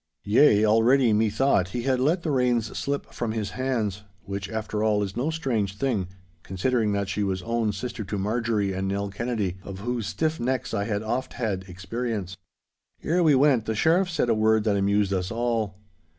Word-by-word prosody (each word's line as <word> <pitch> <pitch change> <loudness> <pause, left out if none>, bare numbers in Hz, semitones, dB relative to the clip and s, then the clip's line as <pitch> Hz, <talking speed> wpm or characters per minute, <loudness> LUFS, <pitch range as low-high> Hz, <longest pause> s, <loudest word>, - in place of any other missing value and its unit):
Yea, 105 0 +5
already 115 +3 +4
methought 110 -1 +2
he 120 - -2
had 130 -1 +1
let 160 +7 +1
the 160 - -1
reins 125 -4 +1
slip 140 0 -3
from 115 -2 -2
his 110 -2 -3
hands—which, 100 -6 -4
after 110 -1 -3
all, 105 -1 +2
is 95 -1 -5
no 130 +6 0
strange 115 -11 -1
thing, 110 -8 0 0.3
considering 110 +4 0
that 100 -1 -1
she 100 +2 -2
was 95 -2 -1
own 115 -2 0
sister 110 +3 -5
to 100 +1 -4
Marjorie 105 -1 0
and 95 +1 -2
Nell 100 +1 -2
Kennedy, 105 -3 -2
of 95 0 -8
whose 120 -2 -2
stiff 160 +8 -1
necks 125 0 -2
I 100 -2 0
had 105 -1 -2
oft 125 +4 -2
had 100 -6 -2
experience. 95 +1 -4 0.7
Ere 175 +3 +1
we 155 -4 +5
went, 130 -4 +4
the 110 - -2
Sheriff 170 - +3
said 165 -7 0
a 115 - +3
word 110 0 +3
that 105 -2 +1
amused 100 0 +2
us 90 -1 -1
all. 115 -4 -1
110 Hz, 185 wpm, -25 LUFS, 100-125 Hz, 0.7 s, Yea